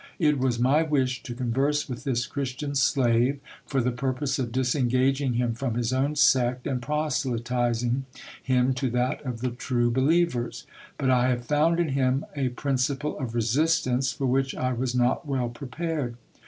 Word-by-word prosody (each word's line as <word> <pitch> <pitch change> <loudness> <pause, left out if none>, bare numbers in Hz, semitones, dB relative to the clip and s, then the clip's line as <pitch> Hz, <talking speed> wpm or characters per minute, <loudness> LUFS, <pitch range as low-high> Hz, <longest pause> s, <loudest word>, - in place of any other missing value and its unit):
It 150 -5 +2
was 125 -2 +1
my 130 +6 +3
wish 130 -6 0
to 120 - -7
converse 135 +4 0
with 125 0 -7
this 120 -3 0
Christian 140 +1 -4
slave, 130 -1 +2 0.3
for 135 - 0
the 125 +1 +1
purpose 130 +3 -2
of 120 -3 -2
disengaging 130 +1 +1
him 120 0 0
from 120 0 -3
his 120 0 0
own 140 +3 0
sect, 125 -3 +3
and 130 -3 -1
proselyting 125 -3 -1 0.4
him 130 0 +2
to 130 0 -1
that 125 +2 -1
of 125 -4 -5
the 125 -1 -1
true 120 -1 0
be 130 +3 +1
lievers. 155 -5 +1 0.3
But 130 -1 +1
I 125 0 +3
have 120 -1 -1
found 155 +5 +2
in 170 -3 +1
him 135 0 +1
a 135 -3 0
principle 135 +3 -1
of 120 -4 -4
resistance 130 +2 +1
for 135 - -3
which 135 +1 +1
I 130 0 -1
was 125 +1 -2
not 125 +5 +1
well 130 -4 -1
prepared. 140 +1 -4
130 Hz, 170 wpm, -26 LUFS, 125-140 Hz, 0.4 s, my